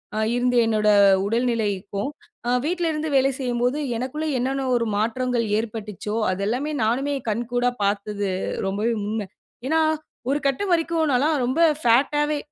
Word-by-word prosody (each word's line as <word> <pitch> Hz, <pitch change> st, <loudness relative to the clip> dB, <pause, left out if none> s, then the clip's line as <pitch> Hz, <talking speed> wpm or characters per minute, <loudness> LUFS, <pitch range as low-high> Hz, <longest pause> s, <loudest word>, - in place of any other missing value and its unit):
ஆ -, -, -2 dB, 0.2 s
இருந்த 245 Hz, 0 st, +1 dB
என்னோட 215 Hz, -1 st, +2 dB, 0.4 s
உடல்நிலைக்கும் 210 Hz, -2 st, -1 dB, 0.4 s
ஆ -, -, +2 dB
வீட்லருந்து 320 Hz, -2 st, -1 dB
வேலை 270 Hz, 0 st, +4 dB
செய்யும்போது 245 Hz, +1 st, 0 dB, 0.2 s
எனக்குள்ள 265 Hz, +6 st, -3 dB
என்னென்ன 265 Hz, +2 st, -1 dB
ஒரு 235 Hz, -1 st, +1 dB
மாற்றங்கள் 235 Hz, +2 st, 0 dB
ஏற்பட்டுச்சோ 215 Hz, -2 st, -4 dB, 0.2 s
அது 185 Hz, +1 st, -3 dB
எல்லாமே 255 Hz, +8 st, -1 dB
நானுமே 265 Hz, +6 st, 0 dB, 0.2 s
கண்கூடா 240 Hz, +3 st, 0 dB
பாத்தது 200 Hz, 0 st, -1 dB, 0.4 s
ரொம்பவே 210 Hz, +4 st, 0 dB
உண்ம. 210 Hz, -1 st, -3 dB, 0.4 s
ஏன்னா 320 Hz, +3 st, +2 dB, 0.5 s
ஒரு 285 Hz, -, +1 dB
கட்டம் 370 Hz, +8 st, -1 dB
வரைக்கும் 330 Hz, -2 st, +1 dB
நான்லாம் 285 Hz, +5 st, +2 dB
ரொம்ப 255 Hz, +6 st, -1 dB, 0.2 s
ஃபேட்டா 270 Hz, +5 st, +3 dB
வே 300 Hz, -, 0 dB
245 Hz, 135 wpm, -23 LUFS, 215-275 Hz, 0.5 s, வேலை